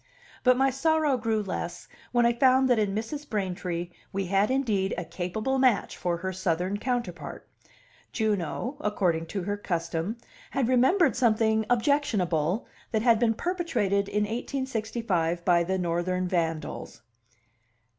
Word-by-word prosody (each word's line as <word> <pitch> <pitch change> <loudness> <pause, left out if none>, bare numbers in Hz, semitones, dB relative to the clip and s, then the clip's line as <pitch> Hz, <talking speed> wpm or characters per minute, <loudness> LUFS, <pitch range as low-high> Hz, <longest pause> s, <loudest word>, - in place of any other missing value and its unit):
But 255 -1 +5
my 270 +1 +3
sorrow 310 +1 +2
grew 225 -3 0
less 195 - -5 0.2
when 240 -1 +3
I 235 - +4
found 260 +2 +4
that 240 - +4
in 205 -2 0
Mrs. 285 +7 -4
Braintree 180 -4 -3 0.2
we 195 0 -2
had 195 +3 +2
indeed 220 -8 +1
a 175 - -3
capable 195 +10 -2
match 255 -5 +2
for 175 -1 -1
her 190 +2 -4
Southern 180 +2 -1
counterpart. 235 -6 -4 0.6
Juno, 220 - -1
according 180 - 0
to 190 +2 -4
her 205 +2 -2
custom, 170 +2 -2 0.3
had 270 -4 0
remembered 265 +8 +4
something 220 -2 +2
objectionable 220 - +1 0.3
that 220 -2 0
had 230 -3 +5
been 230 -2 +2
perpetrated 230 - 0
in 210 0 +1
1865 220 -7 -2
by 175 -2 +4
the 190 +2 -1
Northern 180 +1 -1
vandals. 165 -8 -3
210 Hz, 135 wpm, -27 LUFS, 180-245 Hz, 0.6 s, But